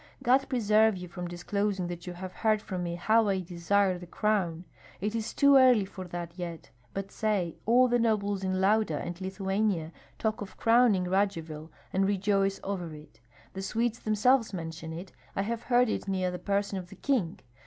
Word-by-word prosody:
God 265 +3 +3
preserve 220 -4 +3
you 180 0 -7
from 175 +1 -6
disclosing 195 +2 -2
that 175 0 -6
you 180 - -4
have 185 +1 -7
heard 215 -1 +2
from 185 -3 -5
me 170 -1 -3
how 220 +5 +3
I 195 -1 +1
desire 180 +2 +1
the 175 - -10
crown, 185 -4 0 0.3
it 210 +3 -2
is 225 0 -2
too 280 -1 +5
early 250 -6 +6
for 190 -1 -8
that 175 -1 -5
yet, 170 -2 -6 0.2
but 195 0 -5
say, 200 -6 -1
'All 250 +3 +6
the 245 0 +2
nobles 205 -4 0
in 185 0 0
Lauda 200 -4 +2
and 175 +3 -6
Lithuania 190 -3 -1 0.3
talk 220 +1 -1
of 200 - -8
crowning 225 -5 +4
Radzivill, 165 -5 -1 0.2
and 195 +1 +2
rejoice 195 0 +1
over 180 -4 -3
it; 150 -4 -15 0.3
the 190 - -5
Swedes 230 +4 -1
themselves 220 +1 +2
mention 160 -1 -6
it, 175 +3 -7 0.2
I 195 - 0
have 230 +2 -3
heard 245 0 +3
it 215 - -3
near 185 -2 0
the 180 - -5
person 200 +1 -1
of 180 -1 -10
the - - -11
king.' 235 -12 -1
195 Hz, 185 wpm, -29 LUFS, 175-215 Hz, 0.3 s, early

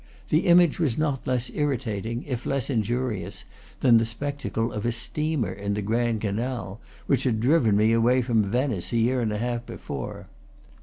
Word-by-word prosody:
The 155 +4 +2
image 175 -2 +5
was 140 -9 +1
not 145 -4 -1
less 125 -1 0
irritating, 115 -5 -2
if 125 -4 -4
less 135 -1 -1
injurious, 120 -1 -2 0.4
than 120 -3 +6
the 115 - +1
spectacle 120 -1 -3
of 105 - -4
a 120 - +1
steamer 150 +3 -1
in 100 +1 -3
the 105 - -2
Grand 115 +1 0
Canal, 110 -1 -3 0.2
which 135 -2 +1
had 115 -4 +1
driven 120 -4 +3
me 110 +2 +4
away 120 +3 +3
from 115 -2 +2
Venice 115 -1 -1
a - - +2
year 125 +3 +2
and 110 -2 0
a 105 - -2
half 120 +1 -2
before. - - -6
120 Hz, 175 wpm, -25 LUFS, 110-135 Hz, 0.4 s, than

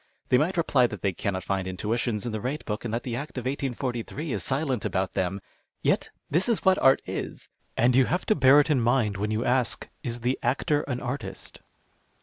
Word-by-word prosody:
They 125 - +5
might 175 +5 0
reply 140 -7 +4
that 105 -6 -8
they 100 -2 +1
cannot 95 +1 -2
find 95 0 -1
intuitions 105 +4 -2
in 120 - -2
the 110 -1 -3
rate 135 +6 -3
book, 105 +1 -3
and 120 - -3
that 115 +1 -2
the 120 -2 -3
Act 140 +2 -6
of 125 - -4
ISJ'S 130 +2 -3
is - - -2
silent 135 -4 0
about 95 0 -1
them. 95 +1 -1 0.4
Yet - - +1 0.2
this 175 - +1
is 230 - 0
what 190 0 +5
art 135 0 +5
is, - - -5 0.3
and 120 +2 +4
you 130 0 +6
have 180 +7 -1
to - - +4
bear 135 +1 +7
it 150 +2 +2
in 135 -4 +3
mind 115 -4 +2
when 105 +2 -1
you 110 +3 -1
ask, 125 -1 +1
" - - -42
Is 120 -1 -4
the 125 +3 0
actor 145 +2 +1
an 125 -3 -2
artist 135 +3 -5
125 Hz, 220 wpm, -27 LUFS, 110-140 Hz, 0.4 s, bear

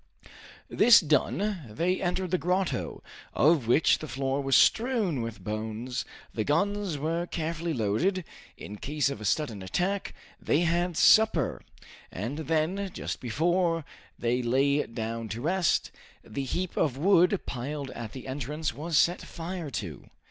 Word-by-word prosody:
This 240 -2 +7
done, 185 +4 0
they 175 +12 -1
entered 180 0 -1
the 185 - +2
grotto, 180 +1 -1 0.3
of 150 -5 +4
which 135 +6 +4
the 155 - -6
floor 135 +2 -1
was 135 -1 +2
strewn 220 - +3
with 115 -4 -6
bones, 110 +4 -4 0.3
the 110 - -1
guns 195 - 0
were 165 +4 -2
carefully 165 0 -3
loaded, 155 - 0 0.3
in 105 - -8
case 145 +3 -1
of 110 - -6
a - - -5
sudden 110 -3 0
attack, 180 - -2 0.3
they 150 - +2
had 175 0 0
supper, 215 - +4 0.5
and 115 +10 -4
then 165 +5 0
just - - -4
before 165 +6 0 0.3
they 120 +1 0
lay 135 +4 +2
down 115 0 -4
to 110 - -4
rest, 175 +2 +1 0.3
the 135 +5 -5
heap 180 +7 -3
of 135 -5 +1
wood 180 +3 +4
piled 140 +2 -4
at 115 -2 -7
the 130 -1 -8
entrance 145 +2 -3
was 155 +4 -1
set 175 +3 +3
fire 170 -1 -6
to. 95 - -6
150 Hz, 145 wpm, -28 LUFS, 125-175 Hz, 0.5 s, This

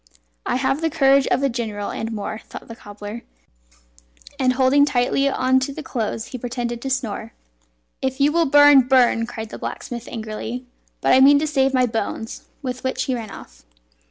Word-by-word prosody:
"I - - 0
have 270 +3 0
the 325 - +1
courage 275 -3 +3
of 260 +3 +1
a - - +4
general, 220 -5 -4
and 225 +1 -4
more," 215 0 -5
thought - - -11
the 230 - -9
cobbler; 205 +2 -9 1.2
and 255 -1 +3
holding 265 +2 +4
tightly 275 0 +1
on 260 -1 +2
to 260 +2 -3
the 310 - -7
clothes 225 -3 -3
he 255 - -7
pretended 240 -1 -4
to 270 - -4
snore. 225 -4 -3 0.7
"If 265 +1 -2
you 285 +2 +4
will 335 0 +2
burn, 290 -2 +7
bum!" 245 -3 +3
cried 220 -2 -7
the - - -8
blacksmith 240 -1 -6
angrily, 225 +2 -6 0.4
"but - - +3
I 260 - +6
mean 280 +2 +7
to 300 - 0
save 270 -3 +1
my 255 -1 +4
bones" 225 -1 -4 0.2
with 255 -1 -5
which 260 - -1
he 260 - -2
ran 230 -3 -5
off. - - -13
255 Hz, 185 wpm, -21 LUFS, 230-270 Hz, 1.2 s, burn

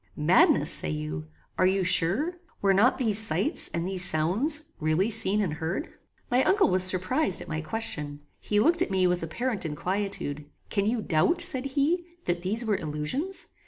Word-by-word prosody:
"Madness, 155 +5 +4
say 75 - +2
you? 75 +1 -5 0.3
Are 185 - +4
you 190 0 0
sure? 190 - +1 0.3
Were 195 -1 +2
not 220 +7 +3
these 220 -5 +1
sights, 225 +8 0
and 170 +1 -3
these 185 -1 0
sounds, 205 - +2 0.2
really 160 +8 0
seen 210 -1 +2
and 180 -7 -2
heard?" 165 - -5 0.4
My 250 +2 +3
uncle 405 +1 +2
was 185 0 +3
surprized 185 - +4
at - - -9
my 155 0 -4
question. 150 -5 -4 0.2
He 210 - -1
looked 335 +9 +3
at - - 0
me 190 -1 +1
with 180 0 0
apparent 220 +7 -3
inquietude. 160 -2 -4 0.3
"Can 200 -1 0
you 225 -1 -1
doubt," 175 - +1
said 260 -4 +2
he, 330 +6 +1 0.2
"that 175 -1 -2
these 215 +6 -2
were 210 -3 0
illusions? 165 - -3
190 Hz, 175 wpm, -26 LUFS, 160-240 Hz, 0.4 s, Madness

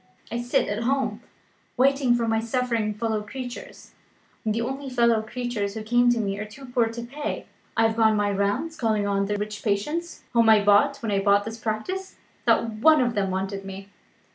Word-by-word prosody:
I 235 +1 -2
sit 240 +1 +1
at 205 +2 -2
home, 270 +3 0 0.6
waiting 270 -1 +3
for 235 -1 0
my 225 0 +2
suffering 230 -2 -1
fellow 220 -1 -1
creatures; 245 +3 -8 0.5
and 215 -1 0
the 230 - 0
only 270 +3 -4
fellow 235 -3 +3
creatures 220 -3 -3
who 220 - -4
come 240 +2 +3
to 240 -1 +2
me 200 -2 -2
are 210 - -3
too 240 +6 -12
poor 245 -2 +1
to 230 +1 -6
pay. 280 +5 -5 0.3
I 225 - +4
have 225 0 0
gone 220 -1 +4
my 205 0 +1
rounds, 200 +11 -1
calling 220 -5 0
on 200 0 0
the 205 0 -1
rich 210 0 -5
patients 295 +12 -2
whom 230 -1 +5
I 215 -2 +6
bought 205 +7 +4
when 220 - -1
I 200 - +2
bought 200 0 +3
the 225 - -4
practice. 230 - -4 0.3
Not - - +4
one 310 +7 +6
of 245 -2 +1
them 200 -3 0
wanted 195 +1 -3
me. 195 0 -8
225 Hz, 200 wpm, -25 LUFS, 205-245 Hz, 0.6 s, I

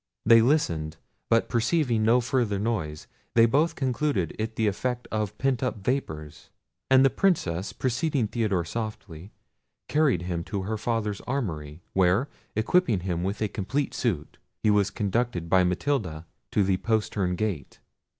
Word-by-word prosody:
They 115 +1 +7
listened; 85 - +1 0.3
but 115 0 +3
perceiving 120 0 +1
no 120 +3 +4
further 120 -4 0
noise, 95 -9 -2 0.3
they 115 -1 +7
both 150 +7 +2
concluded 130 - -1
it 110 +1 -3
the 110 - +1
effect 125 +4 -1
of 105 -1 -2
pent 135 -2 0
up 130 -4 -1
vapours. 80 - -4 0.4
And 130 0 +6
the 135 - +4
Princess, 95 - 0
preceding 130 0 0
Theodore 105 -6 0
softly, 100 -3 -6 0.6
carried 145 - +2
him 85 -2 -3
to 100 -3 -3
her 110 +2 -3
father's 110 -3 -1
armoury, 85 - -3
where, 95 +8 +3 0.3
equipping 110 - +2
him 90 -2 -2
with 100 +3 -2
a - - +1
complete 115 +8 -2
suit, 90 - -2 0.2
he 110 - +4
was 105 -1 +3
conducted 105 -4 -1
by 95 +2 +4
Matilda 90 - -1 0.2
to 105 - +2
the 95 -1 +2
postern 105 -4 0
gate. 90 -9 -3
110 Hz, 150 wpm, -26 LUFS, 90-125 Hz, 0.6 s, They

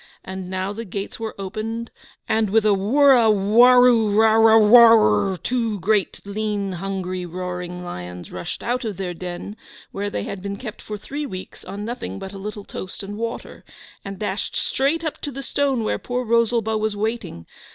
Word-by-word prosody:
And 190 -1 -7
now 190 +1 -3
the 225 +2 -6
gates 200 0 -6
were 225 -1 -5
opened, 220 +4 -5 0.4
and 220 -1 +1
with 220 +2 +3
a 210 - +5
wurrawarrurawarar 225 - +5
two 230 -4 -1
great 205 +2 0
lean, 205 -1 -2
hungry, 185 0 -4
roaring 180 0 -5
lions 90 - -8
rushed 90 - -6
out 250 +2 -1
of 215 -5 -4
their 180 -2 -3
den, 180 +3 -7 0.4
where 205 +1 -3
they - - -3
had 195 - -6
been 200 +1 -5
kept 215 -3 -8
for 210 - -6
three 285 +7 -5
weeks 185 -5 -9
on 205 +1 -6
nothing 215 - -5
but 190 - -8
a 195 - -8
little 205 0 -6
toast 185 +1 -8
and 200 +1 -6
water, 230 +2 -6 0.4
and 195 0 -7
dashed 205 0 -3
straight 290 +5 0
up 315 - -4
to 290 - -4
the 275 +1 -7
stone 275 -5 0
where - - -1
poor 250 0 -3
Rosalba 230 -1 +1
was 215 -1 -1
waiting. 215 - -3
210 Hz, 165 wpm, -22 LUFS, 190-230 Hz, 0.4 s, a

